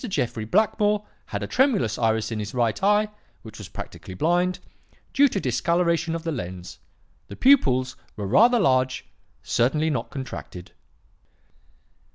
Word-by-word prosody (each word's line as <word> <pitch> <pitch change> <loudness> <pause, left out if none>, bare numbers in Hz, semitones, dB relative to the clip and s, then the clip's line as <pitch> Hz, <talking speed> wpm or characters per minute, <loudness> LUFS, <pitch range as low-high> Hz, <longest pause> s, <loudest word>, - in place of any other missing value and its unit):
Jeffrey 120 - -2
Blackmore 210 - +1 0.2
had - - -4
a - - -1
tremulous 235 - +1
iris 110 -1 0
in 110 - -3
his 105 +3 -6
right 115 -3 0
eye 210 +2 +3 0.4
(which 110 -1 -11
was 105 - -8
practically 95 0 -9
blind), 175 - +1 0.6
due 285 +1 +5
to 210 - -2
dislocation 170 +5 0
of 165 - -5
the 165 - -2
lens. 90 - -7 0.5
The - - -9
pupils 130 - +3 0.2
were 105 - -5
rather 230 - +5
large; 130 -6 +1 0.4
certainly 150 +7 +1
not 120 -5 -3
contracted.' 120 -9 -8
135 Hz, 140 wpm, -24 LUFS, -, 0.6 s, due